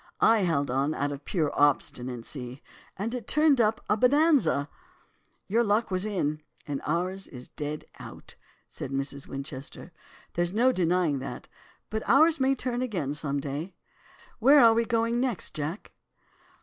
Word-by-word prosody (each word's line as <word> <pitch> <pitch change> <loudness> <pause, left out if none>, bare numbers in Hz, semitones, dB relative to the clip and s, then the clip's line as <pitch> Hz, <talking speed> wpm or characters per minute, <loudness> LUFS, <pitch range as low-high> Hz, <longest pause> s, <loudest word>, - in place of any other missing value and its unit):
I 225 0 +5
held 160 -8 0
on 140 +4 0
out 145 0 -1
of 145 0 -8
pure 155 -6 0
obstinacy, 125 -2 -1 0.3
and 215 +5 -3
it 250 -2 -5
turned 300 -4 +4
up 220 0 +1
a - - +3
"bonanza."' 270 - +3 0.8
"'Your 230 +4 +2
luck 210 0 +1
was 185 +2 0
in, 155 -8 -1 0.2
and 145 -2 -4
ours 180 +5 -1
is 125 -2 -10
dead 150 +1 -5
out,' - - -10 0.3
said - - -7
'Mrs. 135 0 -3
Winchester,' 135 +4 -7 0.4
'there's 175 +1 -1
no 245 +4 +4
denying 175 - +1
that, 130 -1 -7 0.4
but 220 0 -2
ours 315 +4 +5
may 265 +1 +3
turn 250 -1 -2
again 185 - -2
some 145 -2 -1
day. 145 +6 -5 0.6
Where 275 +6 +7
are 230 -1 +7
we 230 +1 +1
going 230 +1 +1
next, 245 -7 -2
Jack? 155 +6 -5
180 Hz, 150 wpm, -27 LUFS, 145-230 Hz, 0.8 s, Where